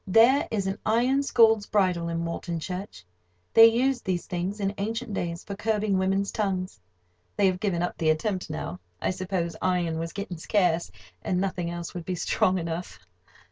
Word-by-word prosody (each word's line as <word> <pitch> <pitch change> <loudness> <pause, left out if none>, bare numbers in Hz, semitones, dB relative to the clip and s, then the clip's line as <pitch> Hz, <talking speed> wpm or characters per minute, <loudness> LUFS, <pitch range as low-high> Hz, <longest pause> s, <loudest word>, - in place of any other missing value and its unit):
There 230 +8 +5
is 200 -3 -1
an 195 +1 -2
iron 245 +5 +2
"scold's 225 -6 +4
bridle" 180 -5 +1
in 165 0 -2
Walton 170 0 -3
Church. 180 - -6 0.5
They 225 0 +10
used 250 +2 +1
these 180 -3 -2
things 185 +3 -3
in 200 0 -1
ancient 225 +2 -3
days 170 -3 -3
for 200 - -6
curbing 210 -2 0
women's 195 +1 +1
tongues. 185 - -2 0.6
They 205 - +3
have 185 -1 +2
given 180 -4 0
up 175 - -3
the 160 -2 +2
attempt 185 +3 0
now. 160 +3 -5 0.2
I - - 0
suppose 185 -2 -2
iron 175 -3 0
was 165 0 -3
getting 200 -3 -5
scarce, 175 - +1 0.3
and 180 - -1
nothing 185 -3 -1
else 170 0 -5
would 175 -2 -6
be 185 - -2
strong 185 +2 +1
enough. 165 - -4
185 Hz, 180 wpm, -26 LUFS, 170-210 Hz, 0.6 s, They